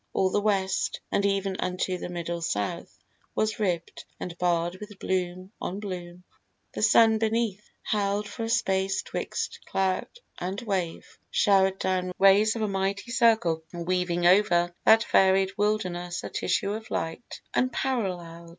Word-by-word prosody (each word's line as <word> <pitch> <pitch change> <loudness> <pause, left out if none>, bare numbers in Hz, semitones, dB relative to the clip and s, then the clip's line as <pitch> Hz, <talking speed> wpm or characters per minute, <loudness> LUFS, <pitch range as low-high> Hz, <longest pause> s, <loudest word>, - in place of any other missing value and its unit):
All 190 -1 +2
the 205 - +1
West, 195 -2 0
And 200 - +1
even 195 -1 -1
unto 180 0 -1
the - - -5
middle 170 -1 -4
South, 105 -11 -2 0.4
was 215 0 0
ribb'd 175 -5 -2 0.2
And 175 - -5
barr'd 175 0 +1
with 210 -1 -10
bloom 185 0 -2
on 190 +3 -3
bloom. 180 -3 -7 0.5
The - - -4
sun 220 +1 +5
beneath, 220 -2 -1
Held 205 0 0
for 225 - -5
a - - -4
space 195 -5 +1
'twixt - - -4
cloud 190 -1 0 0.3
and 185 +3 -3
wave, 190 -7 -2 0.2
shower'd 195 -1 +3
down 185 -1 -1
Rays 200 +3 +5
of 225 - -2
a - - +1
mighty 195 +3 -2
circle, 220 -10 +3
weaving 175 0 -1
over 175 -2 +4
That 225 +1 +7
varied 190 -1 +3
wilderness 185 -4 -1
a - - -5
tissue 200 - 0
of 220 +1 -7
light 165 +8 -4
Unparallel'd. 185 -10 -2
190 Hz, 145 wpm, -27 LUFS, 175-210 Hz, 0.5 s, That